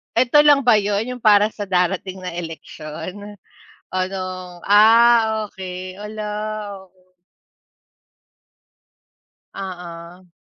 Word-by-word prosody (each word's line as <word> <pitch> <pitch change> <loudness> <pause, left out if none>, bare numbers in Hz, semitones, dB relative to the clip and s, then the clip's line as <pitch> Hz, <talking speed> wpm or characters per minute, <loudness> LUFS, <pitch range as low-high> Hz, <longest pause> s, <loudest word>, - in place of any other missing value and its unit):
Eto 255 +5 +4
lang 290 -2 +6
ba 240 -4 +5
yun 210 +4 -1
yung 245 - -21
para 210 +1 +5
sa 205 -1 -7
darating 185 0 -1
na 180 - -5
eleksyon, 170 +4 -8 0.6
o - - -8
nung 185 -2 -7
ah, 220 0 +5
okey. 185 0 -8
Hala, 210 +1 -7 0.6
oo. 185 0 -32 2.4
Oo. 180 -1 -9
195 Hz, 95 wpm, -20 LUFS, 180-215 Hz, 2.4 s, lang